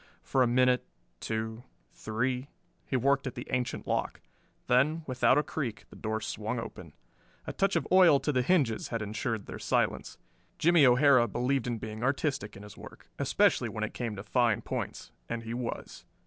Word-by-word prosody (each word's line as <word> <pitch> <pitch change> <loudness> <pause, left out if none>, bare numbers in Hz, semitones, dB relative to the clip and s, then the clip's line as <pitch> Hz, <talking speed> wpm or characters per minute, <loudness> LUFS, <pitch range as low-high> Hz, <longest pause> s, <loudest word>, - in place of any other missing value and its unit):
For 130 - +1
a 125 - +5
minute, 125 +1 +3 0.4
two, 110 +1 -3 0.3
three, 125 +4 -2 0.4
he - - -2
worked 135 +2 +2
at 130 - -5
the 120 - -6
ancient 125 -1 -2
lock; - - -2 0.5
then, 150 +6 +2
without 130 0 +3
a 150 - +3
creak, 130 -10 -4
the - - -12
door 110 0 -3
swung 110 +3 -3
open. 115 - -7 0.5
A - - -5
touch 195 0 +1
of - - 0
oil 180 -6 +7
to 150 - 0
the 130 -3 +2
hinges 130 -6 +1
had 115 -2 -3
insured 110 0 -3
their - - -8
silence. - - -1 0.4
Jimmie 165 -4 +5
O'Hara 125 -1 +5
believed 125 +3 -1
in 120 -2 -1
being 110 0 -7
artistic 135 -6 -1
in 100 - -11
his 105 0 -11
work, - - -13
especially - - +2
when - - -4
it - - -3
came 115 -3 -4
to 95 - -7
fine 115 0 +1
points, - - -5 0.2
and 115 0 -3
he 115 0 -5
was. 120 -1 -5
125 Hz, 180 wpm, -29 LUFS, 110-135 Hz, 0.5 s, oil